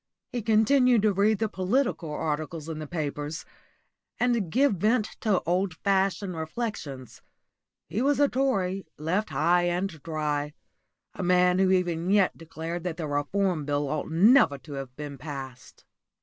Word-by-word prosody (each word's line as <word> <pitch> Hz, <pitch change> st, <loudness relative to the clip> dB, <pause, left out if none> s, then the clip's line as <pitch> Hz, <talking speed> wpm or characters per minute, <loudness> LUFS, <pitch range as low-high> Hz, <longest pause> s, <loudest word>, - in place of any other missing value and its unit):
He 245 Hz, -, -2 dB
continued 230 Hz, +2 st, +4 dB
to 210 Hz, -2 st, +3 dB
read 205 Hz, +3 st, +3 dB
the 220 Hz, -, 0 dB
political 200 Hz, -, -1 dB
articles 155 Hz, +1 st, -3 dB
in 160 Hz, -1 st, -5 dB
the 155 Hz, -, -6 dB
papers, 150 Hz, 0 st, -4 dB, 0.7 s
and 235 Hz, -8 st, +1 dB
give 260 Hz, -4 st, +3 dB
vent 215 Hz, +4 st, +2 dB
to 210 Hz, -4 st, +1 dB
old 180 Hz, 0 st, 0 dB
fashioned 195 Hz, +1 st, 0 dB
reflections. 160 Hz, -, -5 dB, 0.7 s
He 215 Hz, -, -2 dB
was 285 Hz, +1 st, +2 dB
a 290 Hz, -, +5 dB
Tory, 195 Hz, -10 st, -1 dB
left 180 Hz, +8 st, -1 dB
high 175 Hz, +3 st, +2 dB
and 175 Hz, +3 st, 0 dB
dry 150 Hz, -2 st, -2 dB, 0.6 s
a -, -, -6 dB
man 180 Hz, 0 st, +3 dB
who 190 Hz, -1 st, +4 dB
even 175 Hz, -2 st, +1 dB
yet 200 Hz, -2 st, +3 dB
declared 165 Hz, +1 st, -6 dB
that 175 Hz, -3 st, -3 dB
the 165 Hz, -, -3 dB
Reform 155 Hz, +4 st, 0 dB
Bill 145 Hz, 0 st, -1 dB
ought 155 Hz, 0 st, -3 dB
never 175 Hz, -, +5 dB
to 145 Hz, +2 st, -11 dB
have 135 Hz, -2 st, -7 dB
been 145 Hz, -2 st, -7 dB
passed. 130 Hz, -4 st, -9 dB
180 Hz, 150 wpm, -27 LUFS, 155-205 Hz, 0.7 s, a